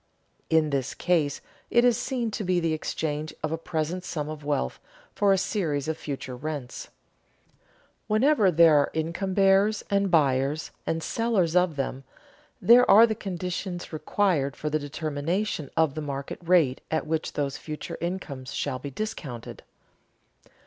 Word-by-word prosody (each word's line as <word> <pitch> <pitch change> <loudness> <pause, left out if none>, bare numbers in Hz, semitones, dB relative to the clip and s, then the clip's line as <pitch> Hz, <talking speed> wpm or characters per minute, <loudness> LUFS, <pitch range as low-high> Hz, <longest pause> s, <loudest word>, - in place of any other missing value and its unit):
In 160 -2 +3
this 135 -3 -1
case 160 -5 +1 0.3
it 240 +1 +4
is 245 -2 +5
seen 240 -2 -2
to 210 - -3
be 180 -1 +1
the 165 -2 0
exchange 155 0 -3
of 155 - -1
a - - +1
present 165 +2 -3
sum 150 -4 -4
of 155 -1 -7
wealth 145 - -1 0.3
for 205 -1 +3
a 195 - +4
series 165 -8 -1
of 160 - -1
future 135 -4 -6
rents. 140 -2 -6 1.2
Whenever 215 -1 +4
there 165 -2 +6
are 145 - +3
income 170 +4 -2
bearers 195 +2 +4
and 200 0 +2
buyers 145 -2 +2 0.2
and 165 0 -1
sellers 210 -8 0
of 180 -3 +3
them, 135 -1 -3 0.6
there 245 +2 +6
are 220 +4 +9
the 225 - -1
conditions 180 -3 -5
required 155 -4 0
for 150 - -4
the 155 - +1
determination 155 +4 -2
of 160 -4 +3
the 155 - -4
market 140 -2 -5
rate 165 -7 +3
at 160 -1 -1
which 160 0 -2
those 140 -2 -2
future 155 -1 -6
incomes 145 -7 -4
shall 130 -3 -2
be 140 - -6
discounted. 140 - -6
160 Hz, 155 wpm, -26 LUFS, 145-190 Hz, 1.2 s, are